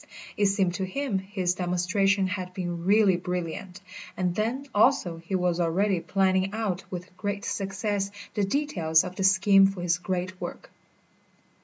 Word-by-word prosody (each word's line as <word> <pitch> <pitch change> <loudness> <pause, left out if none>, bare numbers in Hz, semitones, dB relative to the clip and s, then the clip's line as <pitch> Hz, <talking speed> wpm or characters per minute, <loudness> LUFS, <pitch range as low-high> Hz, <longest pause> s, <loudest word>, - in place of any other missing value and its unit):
It 205 - +3
seemed 195 -3 +1
to 190 - -3
him 210 +2 -2
his 190 -2 -1
demonstration 185 +2 +1
had 185 -1 -4
been 175 -2 -4
really 200 -2 +4
brilliant, 180 +1 -5 0.4
and 180 -2 0
then, 230 +8 -2
also, 205 -6 +3
he 170 +4 -4
was 180 -1 +1
already 180 +3 +1
planning 190 +1 +1
out 195 -4 -2
with 180 0 -7
great 205 0 -3
success 195 0 -2 0.2
the 205 - 0
details 195 - +2
of 180 0 -7
the 195 - -2
scheme 195 +1 +6
for 195 -2 -5
his 175 -1 +1
great 185 0 -3
work. - - -7
190 Hz, 155 wpm, -27 LUFS, 180-200 Hz, 0.4 s, scheme